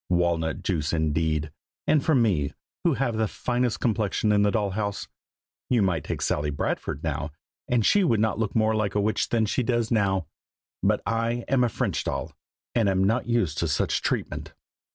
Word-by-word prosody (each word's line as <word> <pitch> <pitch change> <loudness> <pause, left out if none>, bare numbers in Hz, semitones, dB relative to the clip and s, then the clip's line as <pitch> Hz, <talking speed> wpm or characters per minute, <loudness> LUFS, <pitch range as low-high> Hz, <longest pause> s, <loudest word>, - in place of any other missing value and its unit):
Walnut 85 -3 +1
juice, 80 -5 -1
indeed! 80 -1 0 0.3
and 150 -3 +3
for 160 - +3
me, 95 - +2 0.3
who 170 -5 +3
have 120 -3 -1
the 110 0 +1
finest 120 +1 -1
complexion 110 -2 +1
in 105 -1 +4
the 105 - +4
doll 100 -2 0
house! 100 0 -3 0.6
You 120 -5 +3
might 85 -6 0
take - - -3
Sally 75 0 0
Bradford, 70 0 -3
now, 80 -1 -2 0.4
and 120 -4 +2
she 205 - +5
would 115 - +2
not 110 0 +1
look 110 -3 -1
more 110 0 +3
like 105 -2 -1
a - - +3
witch 105 +1 0
than 115 -2 +2
she 110 - 0
does 120 -1 0
now; 95 -5 +2 0.6
but - - +1
I 115 +1 -1
am 130 -1 +3
a 120 - +2
French - - -1
doll, - - -3 0.4
and 115 -4 +2
am 95 0 +2
not 115 +6 +1
used 105 -11 +1
to 85 - +1
such 70 -2 0
treatment." - - -3
105 Hz, 190 wpm, -26 LUFS, 85-115 Hz, 0.6 s, she